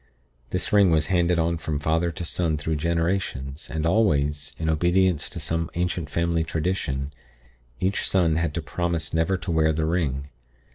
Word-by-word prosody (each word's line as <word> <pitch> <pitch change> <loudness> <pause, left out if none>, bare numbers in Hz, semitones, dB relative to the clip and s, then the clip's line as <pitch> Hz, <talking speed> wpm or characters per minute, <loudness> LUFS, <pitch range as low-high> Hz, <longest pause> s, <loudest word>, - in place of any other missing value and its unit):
This 90 +5 -2
ring 100 -3 +6
was 80 -2 +3
handed 85 -1 +3
on 85 0 +1
from 75 -2 -2
father 80 +4 +1
to 85 +1 -5
son 80 -2 0
through 75 +1 -2
generations, 80 -4 -1
and 80 0 -2
always 75 - +1
in 80 - -3
obedience 85 +1 +2
to - - -6
some 80 0 -2
ancient 85 -3 -1
family 85 +1 +1
tradition 75 -4 -2 0.7
each 95 +2 0
son 85 -4 +3
had 80 -2 -1
to 85 - -2
promise 85 -4 -2
never 80 +4 +2
to 90 - -4
wear 80 -1 +3
the 80 0 0
ring. 70 -5 -1
80 Hz, 170 wpm, -25 LUFS, 75-85 Hz, 0.7 s, ring